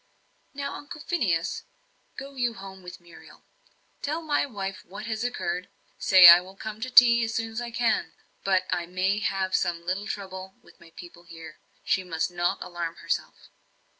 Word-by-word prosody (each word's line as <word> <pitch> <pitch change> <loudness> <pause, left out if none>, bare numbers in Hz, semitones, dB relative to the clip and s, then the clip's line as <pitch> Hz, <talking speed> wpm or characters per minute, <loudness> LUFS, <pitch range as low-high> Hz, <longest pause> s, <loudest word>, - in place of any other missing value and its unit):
"Now, 280 0 -4
Uncle 290 +1 -9
Phineas, 185 - -1 0.6
go 275 +1 -8
you 245 -3 -1
home 190 -1 -10
with 180 -1 -10
Muriel. 175 -1 -16 0.6
Tell 310 +3 -3
my 295 -2 +1
wife 195 -6 -6
what 200 +4 -9
has 220 0 -3
occurred 180 -7 -3 0.3
say, 185 -2 +8
I 170 +1 +11
will 190 +2 -13
come 215 +2 -7
to 255 - -3
tea 235 -2 +7
as 225 0 -3
soon 225 0 -2
as 225 +2 -4
I 240 - -5
can. 230 -8 0 0.3
But 190 -1 +2
I 170 - -1
may 185 +3 0
have 195 -2 -1
some 170 -2 -1
little 190 +4 -2
trouble 190 -2 -7
with - - -21
my 170 - -16
people 175 -1 -12
here. 165 -2 -12 0.2
She 190 - +1
must 165 -1 -2
not 175 0 -1
alarm 170 -1 -5
herself." - - -4
190 Hz, 175 wpm, -26 LUFS, 175-230 Hz, 0.6 s, I